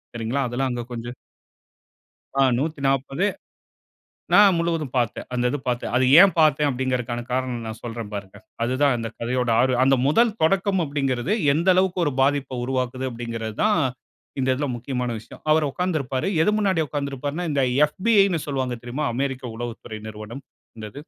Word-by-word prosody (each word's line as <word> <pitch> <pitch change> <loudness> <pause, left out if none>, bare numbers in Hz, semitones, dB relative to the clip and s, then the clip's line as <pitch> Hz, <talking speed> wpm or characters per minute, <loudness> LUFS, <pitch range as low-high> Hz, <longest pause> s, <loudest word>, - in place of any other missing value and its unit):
சரிங்களா? 115 +4 -1
அதெல்லாம் 130 +2 -1
அங்க 120 -1 -3
கொஞ்சம். 120 +1 -6 1.3
ஆ - - +6 0.2
140 140 +1 -1 1.1
நான் 200 -4 +7
முழுவதும் 165 -5 -1
பாத்தேன். 120 -3 -1
அந்த 125 0 0
இது 145 - -2
பாத்தேன். 120 -1 -2
அது 130 - +3 0.2
ஏன் 195 -2 +7
பாத்தேன் 150 -2 +4
அப்டிங்கிறதுக்கான 125 -2 -2
காரணம் 125 -2 -2
நான் 110 0 -6
சொல்றேன் 115 -2 -6
பாருங்க. 100 -1 -7 0.3
அது 125 +2 0
தான் 140 -3 +4
அந்த 115 -1 -4
கதையோட 125 +1 -1
ஆர் 130 0 +3
அந்த 135 0 +4
முதல் 230 +9 +4
தொடக்கம் 190 +2 +2
அப்படின்கிறது 140 - -1 0.2
எந்த 170 +4 0
அளவுக்கு 185 0 +1
ஒரு 145 - 0
பாதிப்பை 135 -1 +1
உருவாக்குது 130 0 -2
அப்படின்கிறது 115 -2 -5
தான் 210 -6 +3 0.6
இந்த 130 - 0
இதில 145 +2 -2
முக்கியமான 125 0 -3
விஷயம். 110 - -14
அவரு 155 0 +4
உட்கார்ந்துருப்பாரு. 155 -6 -2 0.2
எது 210 - +3
முன்னாடி 190 -5 +1
உட்கார்ந்திருப்பாருன்னா 145 +3 -3
இந்த 140 -2 +1 0.3
FBIன்னு 195 -3 +3
சொல்வாங்க 130 -3 -2
தெரியுமா? 135 +5 -3
அமெரிக்க 135 0 -2
உளவு 120 0 -4
துறை 110 -1 -7
நிறுவனம். 110 +5 -9 0.3
அந்த 110 -1 -7
இது. - - -9
130 Hz, 155 wpm, -23 LUFS, 120-155 Hz, 1.3 s, நான்